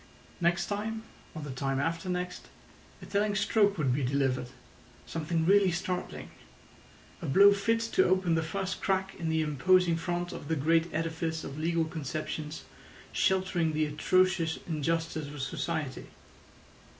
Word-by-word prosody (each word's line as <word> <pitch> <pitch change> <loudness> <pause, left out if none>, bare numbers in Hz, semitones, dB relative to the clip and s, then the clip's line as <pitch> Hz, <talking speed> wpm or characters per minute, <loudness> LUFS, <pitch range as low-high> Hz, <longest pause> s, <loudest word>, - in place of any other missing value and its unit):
Next 175 0 +2
time, 220 +2 -3 0.3
or 155 - -5
the 145 - -5
time 135 +1 -1
after 165 +5 -2
next, 180 0 -3 0.6
a - - -7
telling 205 0 0
stroke 205 -1 +3
would 135 -6 +1
be 140 - 0
delivered—something 135 +5 -3
really 195 +1 +5
startling—a 85 - -7
blow 200 +8 +7
fit 225 +3 +1
to 230 - +2
open 185 -2 +2
the 165 - +2
first 185 +4 -3
crack 190 0 0
in 165 -2 -2
the 160 0 +2
imposing 170 +4 +3
front 175 +2 -2
of - - -8
the 160 - +1
great 165 +3 +2
edifice 160 0 -2
of 140 +2 -6
legal 165 +1 +1
conceptions 155 0 -5 0.5
sheltering 185 -4 +1
the 155 0 +1
atrocious 165 +2 +2
injustice 160 -1 -1
of 145 0 -8
society. 145 +1 -3
165 Hz, 140 wpm, -30 LUFS, 150-185 Hz, 0.6 s, blow